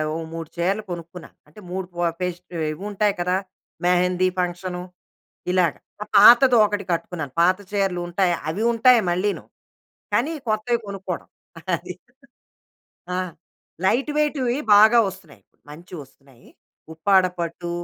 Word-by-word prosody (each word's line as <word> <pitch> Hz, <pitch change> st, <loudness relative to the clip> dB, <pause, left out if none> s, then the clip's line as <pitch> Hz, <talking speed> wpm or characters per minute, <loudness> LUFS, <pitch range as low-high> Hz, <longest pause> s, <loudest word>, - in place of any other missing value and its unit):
ఓ -, -, -2 dB, 0.2 s
3 165 Hz, -1 st, -6 dB
చీరలు 190 Hz, +5 st, -1 dB
కొనుక్కున్నా. 170 Hz, 0 st, -8 dB, 0.2 s
అంటే, 150 Hz, +8 st, -16 dB
3 190 Hz, 0 st, -3 dB
పో 175 Hz, -, -3 dB, 0.2 s
పేస్టవ్ 180 Hz, -2 st, -4 dB
ఇవుంటాయి 205 Hz, +3 st, -1 dB
కదా! 180 Hz, +1 st, 0 dB, 0.5 s
మెహెందీ 180 Hz, +1 st, +2 dB
ఫంక్షను, 180 Hz, 0 st, -3 dB, 0.7 s
ఇలాగ. 180 Hz, -4 st, +2 dB, 0.3 s
ఒక 210 Hz, -, -5 dB
పాతది 240 Hz, +4 st, +8 dB
ఒకటి 205 Hz, -1 st, -2 dB
కట్టుకున్నాను. 165 Hz, -4 st, -3 dB
పాత 185 Hz, +2 st, +4 dB
చీరలుంటాయి. 180 Hz, -2 st, 0 dB, 0.2 s
అవి 205 Hz, +7 st, -2 dB
ఉంటాయి 240 Hz, +1 st, +5 dB
మళ్ళీను, 190 Hz, +3 st, -1 dB, 0.7 s
కానీ 285 Hz, +7 st, +1 dB, 0.2 s
కొత్తవి 215 Hz, +2 st, 0 dB
కొనుక్కోడం. 190 Hz, -3 st, -6 dB, 0.5 s
అది. 180 Hz, -, -8 dB, 1.2 s
ఆ! -, -, -1 dB, 0.7 s
లైట్ 265 Hz, +9 st, +1 dB
వెయిట్‌వి 275 Hz, -5 st, 0 dB, 0.2 s
బాగా 220 Hz, +3 st, +7 dB
ఒస్తున్నాయి. 190 Hz, -5 st, -12 dB, 0.3 s
మంచివొస్తున్నాయి. 140 Hz, -6 st, -13 dB, 0.5 s
ఉప్పాడ 190 Hz, +3 st, +3 dB, 0.2 s
పట్టు, 170 Hz, +1 st, -4 dB
185 Hz, 115 wpm, -22 LUFS, 175-210 Hz, 1.2 s, పాతది